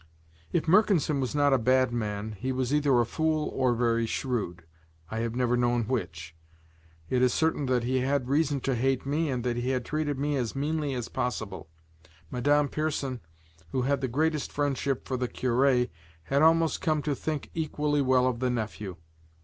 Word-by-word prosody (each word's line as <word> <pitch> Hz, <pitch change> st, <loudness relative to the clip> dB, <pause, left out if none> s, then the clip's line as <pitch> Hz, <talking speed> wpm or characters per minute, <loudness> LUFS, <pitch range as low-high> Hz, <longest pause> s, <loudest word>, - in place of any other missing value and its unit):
If 170 Hz, -, +1 dB
Mercanson 175 Hz, -6 st, +3 dB
was 130 Hz, +1 st, -2 dB
not 145 Hz, -1 st, +4 dB
a 135 Hz, -, +4 dB
bad 130 Hz, +1 st, +3 dB
man, 105 Hz, -2 st, -3 dB
he 110 Hz, +6 st, -4 dB
was 130 Hz, +1 st, -1 dB
either 145 Hz, -4 st, +3 dB
a 120 Hz, -, +3 dB
fool 155 Hz, +4 st, 0 dB
or 130 Hz, -2 st, +1 dB
very 115 Hz, -1 st, +1 dB
shrewd, 105 Hz, -10 st, -3 dB, 0.5 s
I 110 Hz, -, -2 dB
have 115 Hz, 0 st, -2 dB
never 125 Hz, -1 st, +2 dB
known 120 Hz, -1 st, +2 dB
which; 85 Hz, -9 st, -4 dB, 0.7 s
it 125 Hz, -1 st, +1 dB
is 125 Hz, -1 st, +3 dB
certain 160 Hz, -3 st, +1 dB
that 125 Hz, -2 st, +1 dB
he 130 Hz, +2 st, +1 dB
had 130 Hz, 0 st, 0 dB
reason 145 Hz, 0 st, +1 dB
to 135 Hz, -, 0 dB
hate 130 Hz, +2 st, 0 dB
me 150 Hz, +3 st, 0 dB
and 125 Hz, -3 st, -2 dB
that 120 Hz, -1 st, -1 dB
he 125 Hz, +1 st, 0 dB
treated 150 Hz, +1 st, -2 dB
me 145 Hz, +1 st, 0 dB
as 120 Hz, -2 st, -2 dB
meanly 145 Hz, 0 st, -1 dB
as 120 Hz, -2 st, -3 dB
possible. 100 Hz, -8 st, -4 dB, 0.6 s
Madame 145 Hz, +4 st, +2 dB
Pierson, 140 Hz, -4 st, -2 dB, 0.5 s
who 130 Hz, -, +1 dB
had 140 Hz, +1 st, +1 dB
the 130 Hz, -, 0 dB
greatest 150 Hz, +4 st, 0 dB
friendship 140 Hz, -2 st, -1 dB
for 130 Hz, -, -1 dB
the 125 Hz, 0 st, -1 dB
cure, 125 Hz, +1 st, +2 dB, 0.4 s
had 140 Hz, -, +1 dB
almost 165 Hz, 0 st, +4 dB
come 155 Hz, -2 st, +1 dB
to 150 Hz, -, 0 dB
think 150 Hz, +1 st, -4 dB
equally 150 Hz, -2 st, 0 dB
well 130 Hz, -1 st, +3 dB
of 125 Hz, -2 st, 0 dB
the 130 Hz, 0 st, +1 dB
nephew. 110 Hz, -5 st, -3 dB
130 Hz, 180 wpm, -28 LUFS, 120-145 Hz, 0.7 s, not